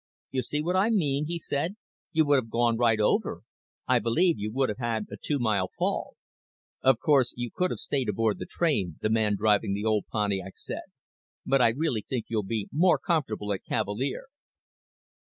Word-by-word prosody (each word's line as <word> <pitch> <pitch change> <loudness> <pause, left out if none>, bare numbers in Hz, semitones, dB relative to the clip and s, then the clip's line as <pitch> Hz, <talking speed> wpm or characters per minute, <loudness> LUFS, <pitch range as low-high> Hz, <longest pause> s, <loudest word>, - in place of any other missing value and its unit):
"You 130 - 0
see 150 +5 -3
what 180 +3 0
I 195 +4 +3
mean," 150 -9 +1
he 170 +1 -2
said. 165 +3 -2 0.4
"You 160 -2 +3
would 145 -1 +4
have 115 -3 -2
gone 120 0 +2
right 115 -2 +3
over. 105 - +1 0.4
I - - +4
believe 165 - +2
you 105 +1 -3
would 130 +3 +1
have 105 - -4
had 115 -3 -1
a - - -5
two 145 - -2
mile 105 -7 +1
fall." - - -1 0.7
"Of 130 -2 +5
course 130 -1 +3
you 120 -2 -3
could 180 0 +1
have - - -3
stayed 135 -6 -2
aboard 110 +1 0
the - - -5
train," 105 - 0
the 110 - 0
man 110 -2 +2
driving 105 -2 +2
the 105 +2 -3
old 110 -2 +1
Pontiac 100 -3 -1
said, - - -6 0.6
"but 135 -1 +3
I 120 - +7
really 125 -2 -1
think 120 +1 -4
you'll 110 -2 0
be 105 +1 -3
more 175 +4 +4
comfortable 110 - -1
at 95 - -5
Cavalier." 120 +7 -2
120 Hz, 190 wpm, -27 LUFS, 105-145 Hz, 0.7 s, I